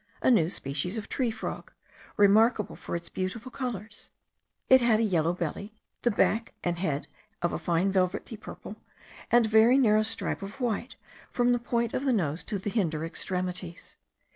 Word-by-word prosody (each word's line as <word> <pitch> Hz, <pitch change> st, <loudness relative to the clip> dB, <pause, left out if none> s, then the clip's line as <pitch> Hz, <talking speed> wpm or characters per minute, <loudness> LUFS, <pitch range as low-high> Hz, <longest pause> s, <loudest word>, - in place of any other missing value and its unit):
a -, -, +5 dB
new 175 Hz, -9 st, +4 dB
species 155 Hz, +5 st, -3 dB
of 215 Hz, -, -5 dB
tree 255 Hz, -3 st, 0 dB
frog, 220 Hz, -, -6 dB, 0.5 s
remarkable 210 Hz, +1 st, +4 dB
for -, -, -6 dB
its 170 Hz, 0 st, -5 dB
beautiful 215 Hz, +9 st, -4 dB
colours; 225 Hz, -6 st, -5 dB, 0.6 s
it 260 Hz, 0 st, +7 dB
had 235 Hz, -2 st, +4 dB
a -, -, +2 dB
yellow 170 Hz, -6 st, +2 dB
belly, 180 Hz, +5 st, -4 dB, 0.3 s
the 240 Hz, -, +2 dB
back 225 Hz, +1 st, +1 dB
and 175 Hz, -1 st, -1 dB
head 150 Hz, -6 st, -2 dB, 0.4 s
of 175 Hz, -, +1 dB
a -, -, -2 dB
fine 175 Hz, +3 st, +1 dB
velvety 190 Hz, +4 st, 0 dB
purple, 215 Hz, -, -10 dB, 0.5 s
and 240 Hz, -1 st, +5 dB
a -, -, -2 dB
very 220 Hz, +4 st, +6 dB
narrow 215 Hz, -5 st, +4 dB
stripe 225 Hz, -1 st, -2 dB
of 200 Hz, +7 st, -8 dB
white 240 Hz, 0 st, -2 dB, 0.3 s
from 245 Hz, 0 st, +2 dB
the 245 Hz, -, +1 dB
point 235 Hz, -1 st, -1 dB
of 260 Hz, -, -1 dB
the 265 Hz, -2 st, +2 dB
nose 160 Hz, -6 st, -1 dB
to 210 Hz, -, -3 dB
the 195 Hz, +2 st, -4 dB
hinder 165 Hz, -8 st, 0 dB
extremities. 180 Hz, 0 st, -4 dB
210 Hz, 175 wpm, -28 LUFS, 180-235 Hz, 0.6 s, it